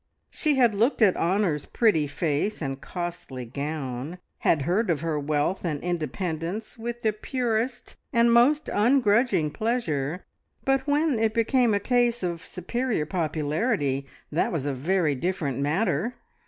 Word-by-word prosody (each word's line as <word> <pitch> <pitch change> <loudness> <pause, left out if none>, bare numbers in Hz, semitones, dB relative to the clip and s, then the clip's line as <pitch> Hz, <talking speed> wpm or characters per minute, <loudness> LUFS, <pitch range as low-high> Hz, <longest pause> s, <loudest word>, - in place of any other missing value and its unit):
She 305 -3 +1
had 240 -4 +4
looked 230 +4 +2
at 195 -4 +5
Honor's 175 -4 +1
pretty 185 -11 +2
face 155 +6 -1
and 135 -3 -4
costly 175 -8 -5
gown, 140 +3 -4 0.2
had 150 -4 +2
heard 190 +8 +1
of 155 -4 +1
her 160 -2 -1
wealth 150 +5 0
and 155 -5 -1
independence 175 +3 -3
with 240 +1 -6
the 215 -1 +2
purest 240 +2 -2
and 235 -1 +4
most 285 +6 +4
ungrudging 220 - +3
pleasure, 180 - -2 0.4
but 270 +1 +1
when 290 -3 +2
it 220 -1 +1
became 230 -1 +3
a - - +2
case 240 -1 +1
of 170 -1 -3
superior 215 0 -2
popularity, 155 - -1 0.2
that 155 - +1
was 155 -5 -2
a 145 - 0
very 160 +3 +1
different 145 -3 -2
matter! 195 - 0
185 Hz, 140 wpm, -26 LUFS, 150-235 Hz, 0.4 s, at